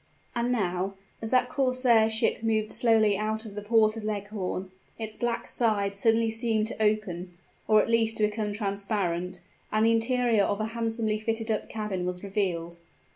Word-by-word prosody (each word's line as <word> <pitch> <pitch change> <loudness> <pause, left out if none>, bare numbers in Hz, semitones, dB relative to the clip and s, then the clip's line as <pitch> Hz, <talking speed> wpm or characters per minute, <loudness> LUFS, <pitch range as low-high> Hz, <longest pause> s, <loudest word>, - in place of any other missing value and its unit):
And 240 +1 0
now 190 -4 -1 0.3
as 225 - -3
that 250 0 +3
corsair 255 -4 +3
ship 220 0 +1
moved 220 -1 0
slowly 220 -3 +3
out 215 +2 -2
of 210 - -8
the 210 - -5
port 215 0 +3
of 225 - -6
Leghorn 200 -3 -3 0.3
its 220 -1 -5
black 240 -1 -2
side 205 -4 0
suddenly 225 +2 +2
seemed 225 -1 0
to 220 - -6
open, 190 -5 -1 0.3
or 215 -1 +5
at - - -4
least 225 -1 +2
to 215 - +1
become 210 0 0
transparent; 195 -4 -2 0.3
and 215 +1 +3
the 230 - +5
interior 230 -1 +2
of 200 +1 0
a 215 - 0
handsomely 225 -2 -1
fitted 225 0 -2
up 215 - -2
cabin 210 -5 -3
was 180 +1 -4
revealed. 175 -4 -2
215 Hz, 175 wpm, -27 LUFS, 200-225 Hz, 0.3 s, or